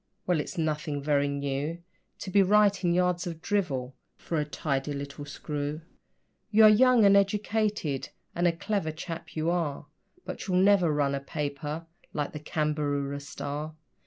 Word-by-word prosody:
Well, 175 -3 +2
it's 150 - -5
nothing 150 -3 -1
very 145 -1 +2
new 140 +4 -3 0.4
To 190 - -5
be 200 - +5
writing 195 -2 +4
yards 180 0 +1
of 165 -2 -5
drivel 145 - -1 0.2
for 165 - -2
a 150 - 0
tidy 145 -1 -2
little 140 +1 -6
screw; 145 +1 -4 0.7
You 220 +1 +6
are 215 - +10
young 240 +1 +6
and 200 0 +7
educated, 205 -6 +1 0.2
and 175 +1 +2
a - - +4
clever 170 -1 -2
chap 160 0 -7
you 160 +1 +1
are, 160 -5 -1 0.4
But - - -6
you'll 180 -2 +2
never 190 -3 +5
run 145 -2 +1
a 140 - -1
paper 150 +2 -4 0.3
like 145 -1 -2
the 150 - -5
CAMBAROORA 150 -2 -1
STAR. 145 +2 -5
155 Hz, 160 wpm, -28 LUFS, 145-185 Hz, 0.7 s, are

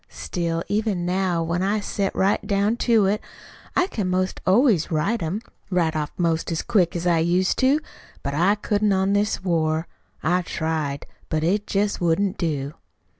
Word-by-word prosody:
Still, 170 -1 -3
even 205 -4 0
now, 180 -2 0
when 170 +2 -1
I 200 +3 +1
set 200 -1 -2
right 195 +2 +2
down 200 +2 +2
to 230 -4 +3
it, 205 +2 +1 0.5
I 360 - +4
can 210 - -3
'most 185 +1 -1
always 205 - +4
write 195 +9 0
'em 180 +7 -3 0.3
right 175 -4 +1
off 150 -2 -2
'most 165 -1 0
as 165 - -1
quick 195 -8 +2
as 170 0 -3
I 170 -2 +3
used 175 +3 +1
to. 270 +3 +4 0.4
But 140 - -2
I 180 +7 +3
couldn't 205 0 +1
on 190 +1 +2
this 205 -1 0
war. 160 -3 +1 0.4
I 180 +3 +2
tried 160 -4 -2
it. - - -16 0.2
But 155 0 0
it 200 +5 +1
jest 205 0 0
wouldn't 180 +3 +1
do. 145 -4 -2
185 Hz, 175 wpm, -23 LUFS, 165-205 Hz, 0.5 s, I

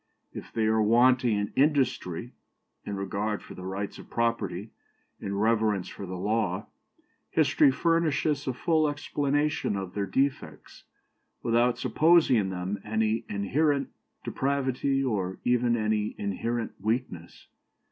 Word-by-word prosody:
If - - -9
they 110 - 0
are 110 0 +3
wanting 120 +1 +4
in 105 0 -3
industry, 130 - +1 0.5
in 100 - -4
regard 100 +2 -2
for - - -11
the 90 - -8
rights 100 +1 -4
of - - -12
property, 110 -4 -1 0.5
in 100 0 -4
reverence 110 -3 +1
for 100 - -8
the 90 0 -5
law, 105 +4 -1 0.6
history - - +4
furnishes 155 -1 +1
a 130 - 0
full 155 +3 +2
explanation 145 -3 -1
of 95 -2 -5
their 100 -1 -2
defects, 135 +6 -2 0.6
without 120 +1 +2
supposing 160 -5 +4
in 100 -3 0
them 95 +2 -3
any 110 +1 0
inherent 140 +8 +1 0.3
depravity, 135 0 0
or 95 -7 -1
even 120 -1 +2
any 110 -1 0
inherent 115 +4 -2
weakness. 105 -6 -3
115 Hz, 125 wpm, -27 LUFS, 100-135 Hz, 0.6 s, wanting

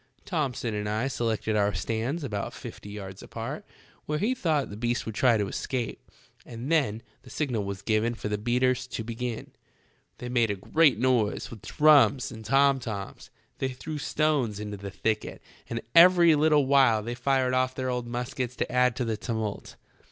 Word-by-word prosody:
Thomson 135 - -2
and 105 0 -2
I 110 +5 0
selected 115 -4 -1
our 105 -1 +2
stands 120 +9 -2
about 105 -7 -4
fifty 105 - -9
yards 95 -2 -8
apart, - - -6 0.4
where 150 - 0
we 215 +10 +1
thought 155 - 0
the - - -6
beast 120 +2 -1
would 110 - -5
try 120 +1 +3
to 105 -2 -1
escape, 120 +3 -4 0.3
and 120 +5 -7
then 120 -9 +1 0.2
the - - -15
signal 125 -9 -2
was 100 0 -5
given 110 +2 +1
for 115 - -5
the 105 0 -2
beaters 125 +3 +1
to 115 - -5
begin. 115 +1 -5 0.7
They 125 - -7
made 120 -2 +2
a 100 - 0
great 145 - +3
noise 120 -3 +1
with 110 -4 -10
drums 145 +1 +4
and 110 -2 -9
tom 135 +3 +3
toms, 105 -5 -6 0.3
they 130 - 0
threw 150 +4 -6
stones 145 -8 0
into 105 -1 -5
the 100 0 -7
thicket, 110 +3 -2 0.3
and 115 0 -3
every 170 -1 +7
little 150 -1 +4
while 130 -6 +4
they 120 +2 -4
fired 130 +1 +1
off 130 0 +1
their 130 -1 -2
old 125 -1 -3
muskets 125 +1 -4
to - - -2
add 125 -1 +3
to 125 - -2
the 110 -2 -2
tumult. 110 -2 -4
120 Hz, 180 wpm, -27 LUFS, 110-135 Hz, 0.7 s, every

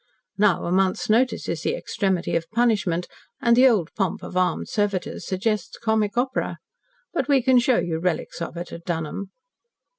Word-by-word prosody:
Now, 205 -3 +3
a 170 - -2
month's 190 +2 +1
notice 245 +4 +2
is - - -2
the - - 0
extremity 195 - -1
of 165 0 -1
punishment, 210 -7 +1 0.3
and 235 -4 +4
the 255 +2 +7
old 205 -10 +1
pomp 195 -4 -2
of - - -8
armed 185 0 +1
servitors 205 -3 -2
suggests 205 +1 -1
comic 220 -1 0
opera. 260 +1 -1 0.6
But - - -1
we 275 -4 +3
can 255 0 +5
show 245 0 +3
you 160 -2 -1
relics 170 -1 -2
of 170 - -5
it 175 +1 -6
at 170 - -8
Dunholm." 170 +3 -3
200 Hz, 175 wpm, -24 LUFS, 175-235 Hz, 0.6 s, the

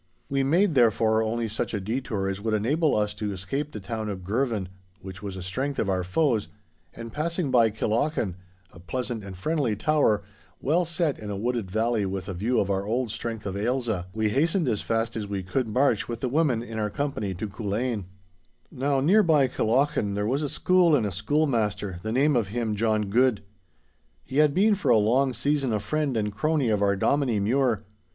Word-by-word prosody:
We 135 0 +1
made, 170 +7 +3
therefore, 110 -3 +3
only 115 +1 -1
such 110 +1 -3
a - - -1
detour 110 -1 -2
as 95 0 -3
would 110 0 0
enable 145 +9 +1
us 105 -1 0
to 105 0 -3
escape 135 +11 -4
the 105 - -6
town 110 +2 -4
of 95 -3 -5
Girvan, 110 -1 -1 0.4
which 95 -1 -9
was 100 -2 -6
a 95 - -6
strength 130 +10 -3
of 100 - 0
our 95 -1 0
foes, 115 - +1 0.4
and 115 0 -9
passing 165 -1 -1
by 115 -3 +5
Killochan, 110 - -1 0.4
a - - -13
pleasant 120 +4 -4
and 95 -2 -8
friendly 140 - 0
tower, 110 -5 +2 0.4
well 170 +6 +1
set 170 -3 -1
in 105 - -7
a 100 - -3
wooded 115 -2 -2
valley 110 0 0
with 95 -1 -4
a 100 - -4
view 110 +8 0
of 100 - 0
our 95 0 0
old 115 +2 -1
strength 115 -1 -5
of 95 -1 -3
Ailsa, 110 -4 -1
we 110 +1 0
hastened 160 - +1
as 110 -4 0
fast 115 0 -1
as 105 -2 -3
we 100 -2 -3
could 115 +7 -1
march 120 -1 +1
with 115 -1 -4
the 130 - -1
women 135 -5 +1
in 115 -2 -6
our 105 -1 0
company 120 -7 -3
to 105 +5 -4
Culzean. 105 +1 -2 0.7
Now 135 +1 0
near 190 +10 +5
by 155 -8 +4
Killochan 125 -3 +1
there 105 0 -1
was 135 +6 0
a 145 - -1
school 180 -1 +3
and 120 -7 +1
a 100 - -2
schoolmaster, 105 - 0
the 110 - -3
name 140 +4 +3
of 115 -5 +1
him 110 +1 -2
John 110 0 +1
Guid. 115 +3 +2 0.8
He 135 - -5
had 150 -1 +4
been 210 +3 +4
for 190 -9 -1
a 120 - +6
long 125 +6 +3
season 140 0 0
a 105 - +1
friend 150 +1 -1
and 105 -1 -1
crony 150 0 +1
of 105 -2 +1
our 100 -1 +3
Dominie 125 +1 +1
Mure. 115 +1 +1
115 Hz, 205 wpm, -26 LUFS, 105-140 Hz, 0.8 s, a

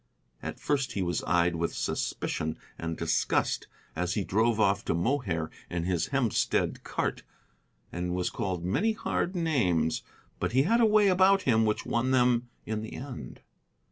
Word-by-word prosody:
At - - -6
first 135 -4 0
he 95 - -1
was 85 -1 -1
eyed 85 -1 +2
with 85 0 -1
suspicion 80 +1 -2 0.2
and 80 0 -4
disgust - - 0 0.3
as 90 +2 -1
he 105 - 0
drove 110 +4 +1
off 100 -1 +3
to - - 0
Mohair 85 - -1 0.2
in 85 -1 -2
his 85 -2 0
Hempstead 135 -5 0
cart, - - -2 0.7
and 90 0 -2
was 90 -1 -1
called 95 -6 -3
many 215 - +1
hard 190 -3 -2
names. 95 - +1 0.4
But - - -1
he 130 +2 +5
had 230 +9 +3
a 225 - +6
way 210 -1 +5
about 190 +1 +5
him 110 -3 +3
which 105 0 0
won 120 +2 0
them 125 -2 +3 0.2
in 110 -1 -2
the 110 - -7
end. 130 -1 -8
110 Hz, 165 wpm, -29 LUFS, 90-135 Hz, 0.7 s, a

